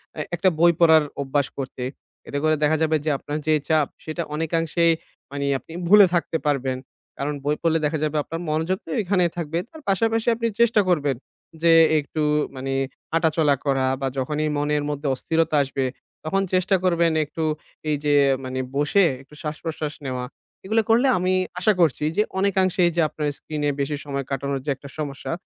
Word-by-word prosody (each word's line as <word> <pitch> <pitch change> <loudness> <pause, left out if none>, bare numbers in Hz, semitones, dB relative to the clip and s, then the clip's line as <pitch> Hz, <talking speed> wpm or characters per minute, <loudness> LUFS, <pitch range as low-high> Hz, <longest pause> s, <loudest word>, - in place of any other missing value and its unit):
এ্যা 155 - -3
একটা 185 +2 +3
বই 170 +1 +6
পড়ার 160 -2 +6 0.2
অভ্যাস 140 0 0
করতে। 130 -1 -5 0.4
এতে 145 - -3
করে 155 0 +3
দেখা 155 +1 +3
যাবে 160 0 +2
যে - - +1
আপনার 145 +2 -5
যে 155 - +4 0.2
চাপ 155 -3 +3 0.2
সেটা 160 +2 -3
অনেকাংশে 165 +1 0 0.5
মানে 140 0 -3
আপনি 160 - -14
ভুলে 205 +2 +8
থাকতে 165 -1 0
পারবেন। 135 -3 0 0.4
কারণ 145 +2 -2
বই 150 +1 +2
পড়লে 165 -1 +2
দেখা 150 +2 0
যাবে 155 0 0
আপনার 165 +3 -6
মনোযোগ 160 +5 0
তো - - -12
এইখানেই 180 -4 +1
থাকবে। 165 -1 -2
তার 315 -1 -13
পাশাপাশি 225 +4 +1
আপনি 230 0 -1
চেষ্টা 230 -2 +5
করবেন 145 -6 +2 0.5
যে 165 -1 +6 0.3
একটু 150 +2 -4 0.3
মানে 135 +1 -3 0.4
হাঁটাচলা 160 -3 +3
করা 135 -2 +1
বা 135 - 0
যখনই 150 +4 -1
মনের 145 0 0
মধ্যে 145 0 -3
অস্থিরতা 160 +3 0
আসবে 135 0 -2 0.4
তখন 195 +5 0
চেষ্টা 185 +1 +3
করবেন 170 -2 +3
একটু 160 +2 -5 0.5
এই 150 - +2
যে 145 - +3 0.3
মানে 130 0 -4 0.2
বসে 150 +8 +3 0.2
একটু 135 +2 -20
শ্বাস 150 0 -4
প্রশ্বাস 155 -2 -3
নেওয়া। 125 -1 -3 0.4
এগুলো 220 +3 +2
করলে 235 +4 +4
আমি 185 +1 +1 0.3
আশা 210 +4 +3
করছি 155 -3 +2
যে 210 - +5 0.2
অনেকাংশে 190 -2 +2
এই - - +1
যে 170 - +3
আপনার 150 0 -3
স্ক্রিনে 150 -1 -3
বেশি 145 +1 -1
সময় 140 -1 -3
কাটানোর 140 0 -2
যে - - -3
একটা 140 +1 -12
সমস্যা 145 -3 -4
155 Hz, 180 wpm, -23 LUFS, 145-170 Hz, 0.5 s, ভুলে